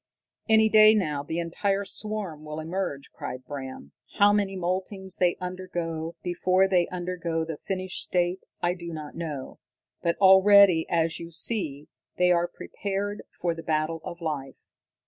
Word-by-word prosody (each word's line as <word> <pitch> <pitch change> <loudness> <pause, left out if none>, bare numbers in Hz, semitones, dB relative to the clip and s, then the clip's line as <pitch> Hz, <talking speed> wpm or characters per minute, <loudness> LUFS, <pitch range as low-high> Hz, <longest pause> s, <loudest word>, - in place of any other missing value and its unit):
"Any 220 0 +6
day 215 0 +7
now 150 -9 0
the 160 +3 -4
entire 195 +4 -1
swarm 200 -7 -3
will 150 0 -6
emerge," 160 -3 -4
cried 130 0 -7
Bram. 130 - -7 0.3
"How 205 0 +6
many 200 -2 0
moultings 190 +1 -3
they 175 -1 +3
undergo 175 -3 -4
before 185 +2 +2
they 180 -3 +2
undergo 175 -2 -3
the 160 -1 -5
finished 185 +1 -3
state, 180 +1 0 0.2
I 175 0 +2
do 170 -2 -7
not 155 -2 -7
know, 150 -6 -6 0.4
but 170 0 0
already, 190 -3 +7
as 165 -1 +1
you 170 - -7
see, 165 -5 -1 0.3
they 180 0 +4
are 175 0 +3
prepared 205 +2 -4 0.2
for 175 -1 0
the 165 - -8
battle 160 0 -1
of 170 0 -8
life. 145 -5 -5
175 Hz, 150 wpm, -26 LUFS, 160-190 Hz, 0.4 s, day